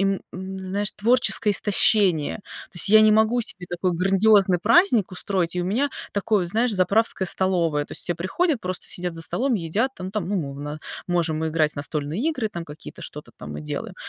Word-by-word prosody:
им 195 0 0
м, 190 +1 -7
знаешь, 195 +2 -2
творческое 230 -1 +3
истощение. 200 -5 +3 0.3
То - - -25
есть, 175 - +4
я 215 +2 +7
не 215 0 +5
могу 220 +3 +2
себе 185 -5 -5
такой 175 +1 -2
грандиозный 195 +1 +3
праздник 240 - +4
устроить, 180 -2 -2
и 180 - 0
у - - -4
меня 235 +10 0 0.2
такое, 200 -2 0
знаешь, 225 +6 0
заправская 195 +1 +2
столовая. 170 -6 0
То - - -11
есть, - - -6
все 175 - -1
приходят, 240 - -1
просто 185 0 -4
сидят 180 -1 -1
за 165 - -5
столом, 250 +10 0
едят, 205 +7 -1
там 185 0 -7
там, 200 -4 -4
ну, 205 - -1
мовна 145 -1 -5 0.3
можем 165 -3 -1
играть 155 -1 0
в - - -17
настольные 145 +4 -3
игры, 260 -9 -2
там, 170 -4 -6
какие-то 150 -1 -12
что-то - - -7
там 75 - -9
мы 75 - -7
делаем - - -6
190 Hz, 195 wpm, -23 LUFS, 170-215 Hz, 0.3 s, я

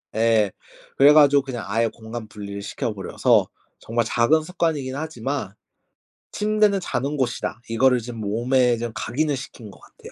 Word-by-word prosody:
예. 110 -2 +3 0.5
그래 140 +2 +7
가지고 145 -2 +6
그냥 120 -6 -6
아예 115 +3 +1
공간 110 0 -8
분리를 100 -1 -8
시켜 105 +2 -4
버려서 95 -2 +1 0.3
정말 115 0 -1
작은 120 +8 +3
습관이긴 155 -6 -2
하지만 140 -7 -4 0.8
"침대는 210 -1 +2
자는 140 0 -2
곳이다." 120 -2 -2
이거를 125 +2 +3
좀 120 +1 -8
몸에 120 +4 +1
좀 120 0 -4
각인을 145 +5 -1
시킨 115 -4 -10
것 - - -17
같아요. - - -15
120 Hz, 325 characters per minute, -23 LUFS, 110-145 Hz, 0.8 s, 그래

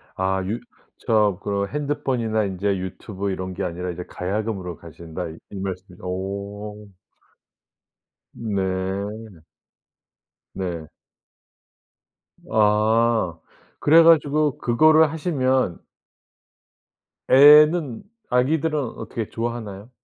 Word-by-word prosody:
아 95 0 0
유 110 +5 -2 0.4
저 105 -5 +2
그 100 -1 -1
"핸드폰이나 125 -6 -1
인제 100 +1 -1
유튜브 95 +2 -5
이런 95 0 -4
게 95 - -4
아니라 90 0 -4
이제 90 +1 -6
가야금으로 95 -2 -4
가신다." 85 +1 -8 0.2
이 100 - -7
말씀이죠. 95 -1 -7
오. 100 +3 -6 1.4
네. 100 -1 -4 1.1
네. 85 -4 -4 1.7
아. 110 -3 +2 0.4
그래 160 +3 +6
가지고 150 -3 +4
그거를 155 +5 +4
하시면 130 - 0 1.5
애는 150 -1 +6 0.3
아기들은 150 +5 +1
어떻게 115 -3 -5
좋아하나요? 115 -3 -5
105 Hz, 190 characters per minute, -23 LUFS, 95-125 Hz, 1.7 s, 그래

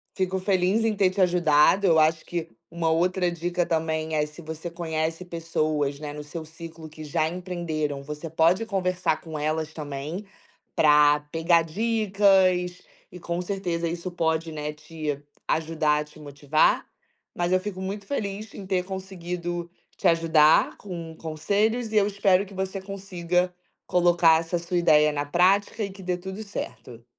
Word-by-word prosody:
fico 190 0 -1
feliz 190 +3 +2
em 215 -2 +1
ter 195 -2 +3
te 185 - -6
ajudado, 175 +1 +4
eu 160 -2 +5
acho 155 +1 +2
que 170 -1 -3 0.2
uma 165 -1 0
outra 180 +2 +2
dica 175 +1 -1
também, 160 -1 -1
é 150 -1 +2
se 150 +3 -12
você 160 +1 -6
conhece 165 0 -3
pessoas, 155 -4 -1
né, 150 -1 -6
no 150 0 -7
seu 160 +2 -7
ciclo 160 0 -10
que 155 0 -11
já 155 +1 0
empreenderam, 165 -5 -3
você 150 +3 -7
pode 165 +7 +3
conversar 185 -5 0
com 160 -2 -7
elas 155 +1 -2
também, 150 +5 -5 0.5
pra 150 -1 +5
pegar 165 +1 +3
dicas, 190 -2 +2 0.3
e 180 - -10
com 170 +1 -3
certeza 180 -3 -2
isso 170 +2 -4
pode, 160 -1 -1
né, 150 -1 -4
te 155 -1 -5 0.3
ajudar 155 -2 +1
a - - -4
te 150 +1 -18
motivar. 145 +1 +1 0.5
Mas 175 +1 -1
eu 185 - +4
fico 190 -1 -6
muito 200 +2 -4
feliz 205 -3 -4
em 195 - -9
ter 185 -1 +1
conseguido 175 -2 -5 0.3
te - - +2
ajudar 165 -2 +4
com 170 -4 -7
conselhos 205 +10 -1
e 215 - 0
eu 200 -1 +5
espero 200 -1 +3
que 200 - -14
você 190 +1 -3
consiga 180 -2 -2 0.3
colocar 175 -2 +4
essa 170 +1 -2
sua 170 +1 -3
ideia 150 -3 +5
na 145 0 -2
prática 195 +7 +2
e 200 - -4
que 190 0 -12
dê 180 -1 -1
tudo 190 +4 -7
certo. 125 - -7
170 Hz, 165 wpm, -25 LUFS, 155-185 Hz, 0.5 s, eu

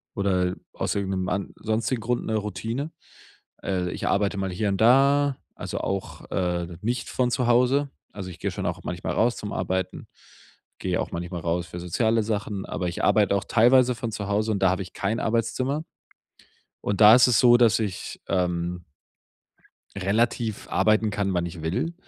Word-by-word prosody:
oder 95 -2 +1 0.2
aus - - -2
irgendnem 95 -2 -1
an 100 -1 -3
sonstigen 110 +2 -1
Grund 120 +2 -1
ne 110 - -1
Routine. 110 - -4 0.7
Äh, 90 -2 -1
ich - - -4
arbeite 100 0 +1
mal 95 -1 -2
hier 100 +3 -1
und 95 -1 -1
da, 140 +4 +4 0.2
also - - -5
auch, 100 -1 -4
äh, 90 -2 -2
nicht 115 +1 -2
von 125 -1 0
zu 125 0 0
Hause. 125 +4 +3 0.2
Also, 95 -2 -6
ich 90 - -11
gehe - - -1
schon - - -5
auch - - -2
manchmal - - -3
raus 120 +1 +2
zum 105 - -6
Arbeiten, 95 0 -3 0.7
gehe - - -1
auch - - -5
manchmal 85 0 -5
raus 85 +1 -1
für 90 - -7
soziale 110 +6 +1
Sachen, 105 -2 -3
aber 90 - -3
ich 85 - -4
arbeite 105 -2 +4
auch 100 - 0
teilweise 125 +2 +5
von 115 0 -4
zu 100 -1 -4
Hause 105 +2 0
und 100 - 0
da 95 - +6
habe 95 +2 0
ich 90 - -13
kein 115 +2 -1
Arbeitszimmer. 120 +6 -1 1.0
Und 100 0 -2
da 110 +2 +10
ist 125 0 +6
es 120 -4 +4
so, 120 -1 +7
dass 115 -2 +4
ich, 100 -5 -4
ähm 90 -2 -1 1.1
relativ 110 +2 0
arbeiten 110 +2 +3
kann, 100 -2 -1
wann 85 0 0
ich 85 -2 -8
will. 95 - -1
105 Hz, 180 wpm, -25 LUFS, 95-120 Hz, 1.1 s, da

